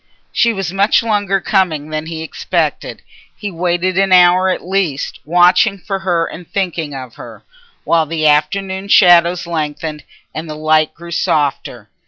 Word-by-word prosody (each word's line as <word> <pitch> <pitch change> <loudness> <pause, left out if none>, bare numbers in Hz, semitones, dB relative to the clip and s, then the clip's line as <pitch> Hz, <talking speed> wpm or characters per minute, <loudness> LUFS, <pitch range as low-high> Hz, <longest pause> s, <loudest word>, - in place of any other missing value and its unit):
She 235 - +2
was 195 -5 -4
much 200 +4 +2
longer 205 -3 0
coming 165 -6 -1
than 155 0 -4
he 160 -1 -6
expected. 160 - -3 0.3
He 205 -2 -5
waited 175 +1 -1
an 195 -1 +1
hour 180 +1 +5
at 185 - -3
least 185 -7 -2
watching 180 +5 +3
for 195 +1 -5
her 175 -3 0
and 170 0 -10
thinking 170 -7 -3
of 130 -3 -8
her, - - -12 0.4
while 165 -2 +1
the 160 0 -2
afternoon 190 +6 0
shadows 175 -3 +5
lengthened 155 -2 -4 0.3
and 160 +1 -6
the 155 - -6
light 155 0 +1
grew 170 +1 -11
softer. 140 -8 -1
175 Hz, 155 wpm, -16 LUFS, 155-190 Hz, 0.4 s, hour